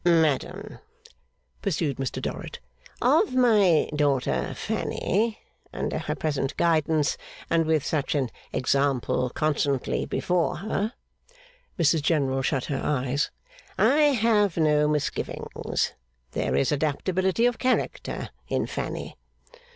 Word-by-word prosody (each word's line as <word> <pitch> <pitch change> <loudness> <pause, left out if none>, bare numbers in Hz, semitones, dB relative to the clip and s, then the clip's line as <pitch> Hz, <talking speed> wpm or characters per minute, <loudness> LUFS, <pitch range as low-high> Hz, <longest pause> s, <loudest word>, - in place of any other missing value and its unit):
'Madam,' 160 -5 +1 0.8
pursued 155 -7 -1
Mr 135 -1 -3
Dorrit, - - -5 0.5
'of 390 -12 +3
my 210 -10 +4
daughter 140 -3 0
Fanny, 215 +3 -1 0.3
under - - -2
her - - -3
present 145 -3 -2
guidance 160 -2 +2 0.3
and 165 -1 +3
with 160 -3 +2
such 150 -1 -1
an 130 -5 0 0.2
example 130 -1 +1
constantly 145 -1 0
before 180 -2 0
her 210 +4 -2 0.4
' - - -29
(Mrs 160 -1 +3
General 140 -4 +1
shut 135 -1 0
her 135 -2 -2
eyes.) 140 0 0 0.5
'I 300 - +4 0.2
have 210 -6 +3
no 150 -2 +3
misgivings. 150 -2 -2 0.4
There 65 - -1
is 70 - +2
adaptability 185 +8 +1
of 245 -1 +1
character 255 0 -1 0.2
in - - 0
Fanny. - - -5
155 Hz, 110 wpm, -26 LUFS, 140-190 Hz, 0.8 s, my